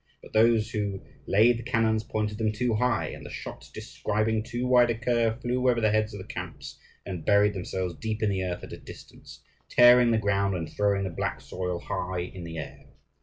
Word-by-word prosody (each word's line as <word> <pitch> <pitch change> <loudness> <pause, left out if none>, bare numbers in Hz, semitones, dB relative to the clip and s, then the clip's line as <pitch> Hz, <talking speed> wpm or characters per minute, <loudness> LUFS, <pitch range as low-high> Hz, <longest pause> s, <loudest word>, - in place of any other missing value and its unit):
But - - -14
those 110 0 +4
who 100 -4 -2 0.3
laid 115 +4 +4
the - - -7
cannons 115 -2 +1
pointed 105 -1 -3
them 110 -1 +1
too 120 +2 -1
high, 120 +1 +1
and - - -9
the - - -9
shot - - -8
describing 110 +1 -1
too 120 +2 -4
wide 125 -1 +5
a 115 - +1
curve 115 -1 +1
flew 125 +1 +1
over 120 -1 +2
the 110 -2 +2
heads 110 0 +1
of - - -7
the 95 - -8
camps, - - -8 0.3
and 90 -4 -5
buried 105 0 +4
themselves 95 -1 -3
deep 110 +3 -4
in 105 - +2
the 95 -1 -1
earth 90 -1 -4
at - - -8
a - - -7
distance, - - -13 0.3
tearing 120 0 +7
the 115 - +3
ground, 100 -2 +1
and 80 -3 -4
throwing 100 -1 +1
the 95 - -3
black - - -3
soil 90 -1 -4
high 90 0 -3
in 90 0 -7
the 80 0 -7
air. 75 - -8
110 Hz, 215 wpm, -27 LUFS, 100-115 Hz, 0.3 s, tearing